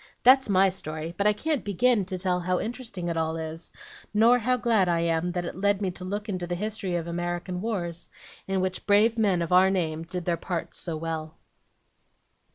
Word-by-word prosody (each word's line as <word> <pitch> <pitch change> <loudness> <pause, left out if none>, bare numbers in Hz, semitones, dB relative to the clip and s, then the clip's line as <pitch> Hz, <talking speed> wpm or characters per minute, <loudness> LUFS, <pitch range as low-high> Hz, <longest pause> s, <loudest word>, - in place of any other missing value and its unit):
That's 265 -1 +6
MY 195 0 +5
story, 160 -3 -5
but 200 +3 +1
I 210 - +5
can't 295 +6 -1
begin 210 +1 +2
to 185 0 -4
tell 180 -1 0
how 180 +1 0
interesting 225 -6 -5
it 170 -1 -2
all 160 0 -1
is, 160 +1 -7 0.4
nor 235 +3 +6
how 250 +2 +1
glad 225 -6 +2
I 170 -1 +2
am 170 +1 0
that 175 -1 -2
it - - -5
led 200 +1 +1
me 195 -3 -1
to 180 - -9
look 205 +3 -4
into 185 -4 -3
the 175 - -2
history 205 -2 -3
of 170 -1 -2
American 175 +1 -3
wars, 175 -6 -3 0.4
in 190 -1 0
which 185 0 -3
brave 210 +3 +5
men 200 -6 +2
of 165 - -5
our 185 +1 +6
name 165 -5 -1
did 175 +1 -5
their 170 -1 +1
parts 170 -1 -4
so 165 -3 -4
well." 160 0 -5
185 Hz, 205 wpm, -27 LUFS, 170-205 Hz, 0.4 s, That's